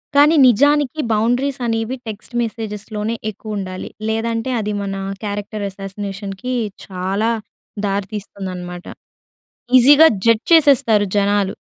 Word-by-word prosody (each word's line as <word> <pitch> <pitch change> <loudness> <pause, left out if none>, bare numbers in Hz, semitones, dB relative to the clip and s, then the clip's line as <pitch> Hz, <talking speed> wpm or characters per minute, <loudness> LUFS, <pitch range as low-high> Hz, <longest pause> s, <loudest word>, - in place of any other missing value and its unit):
కానీ 295 +3 +6
నిజానికి 290 +4 +3
బౌండరీస్ 245 +5 0
అనేవి 225 +2 -1
టెక్స్ట్ 215 +3 -8
మెసేజ్‌లోనే 215 -1 -4 0.2
ఎక్కువ 215 +1 -7
ఉండాలి. 185 -1 -5 0.2
లేదంటే 230 +2 -1
అది 210 0 -2
మన 195 -1 -3 0.3
క్యారెక్టర్ 205 0 -4
అసాసినేషన్‌కి 195 +3 -6 0.3
చాలా 195 +4 -1 0.5
దారితీస్తుందన్నమాట. 190 -3 -5 0.9
ఈజీగా 285 +5 +8 0.2
జడ్జ్ 230 -1 +3
చేసేస్తారు 270 -9 +5
జనాలు. 200 -1 +2
215 Hz, 100 wpm, -19 LUFS, 200-240 Hz, 0.9 s, ఈజీగా